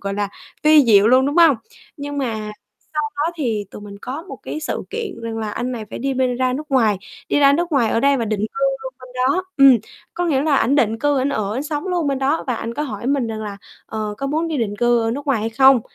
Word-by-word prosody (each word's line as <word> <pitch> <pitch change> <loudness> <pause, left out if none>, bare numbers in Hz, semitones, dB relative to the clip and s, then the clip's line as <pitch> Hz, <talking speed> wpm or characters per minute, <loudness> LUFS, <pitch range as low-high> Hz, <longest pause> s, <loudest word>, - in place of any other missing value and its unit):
gọi 200 0 -3
là, 205 -1 -1 0.3
vi 305 -1 +7
diệu 210 -3 +6
luôn, 255 +3 +5
đúng 290 +3 -1
hông? 330 -6 +6 0.4
Nhưng 285 0 -5
mà 220 -5 -3 0.4
sau 300 - +1
đó 310 +4 0
thì 225 -9 -1
tụi - - -10
mình 200 -1 -10
có 265 +9 -6
một - - -7
cái 310 - -5
sự 300 - -3
kiện 445 - -5
rằng 225 -1 -4
là 215 -1 -3
anh 245 +4 -3
này 230 -3 -5
phải - - -6
đi 270 +1 -1
bên 255 -1 +1
ra 255 0 +1
nước 300 +4 -5
ngoài, 225 -7 +3 0.3
đi - - +2
ra 280 -1 +6
nước 340 +3 0
ngoài 245 -6 +3
ở 230 - +1
đây 280 +2 +4
và 235 - -1
định 215 -2 -2
cư 220 +6 -3 0.2
luôn 260 0 -6
bên 255 - -12 0.2
đó, 360 +8 +1
ừm, 275 -3 +8 0.4
có 355 - -1
nghĩa 280 -4 +2
là 295 -3 +2
ảnh 265 +1 +2
định 225 -5 +2
cư 290 +2 +1
ảnh 265 +2 +1
ở, 210 -7 -2
ảnh 265 - -2
sống 295 +2 -4
luôn 350 -4 0
bên 275 -1 0
đó 275 +4 0
và 250 - 0
anh 230 +1 -5
có 295 - -2
hỏi 235 -5 -5
mình 275 -2 +1
rằng 220 -1 -4
là 205 -1 -6 0.3
"Ờ, 215 -1 -4
có 275 - -2
muốn 315 +4 -1
đi 320 - -2
định 205 -3 -2
cư 240 +1 +3
ở 225 0 0
nước 280 +4 -5
ngoài 270 -6 +1
hay 225 +1 -2
không?" 265 +2 +6
260 Hz, 275 wpm, -20 LUFS, 225-290 Hz, 0.4 s, ừm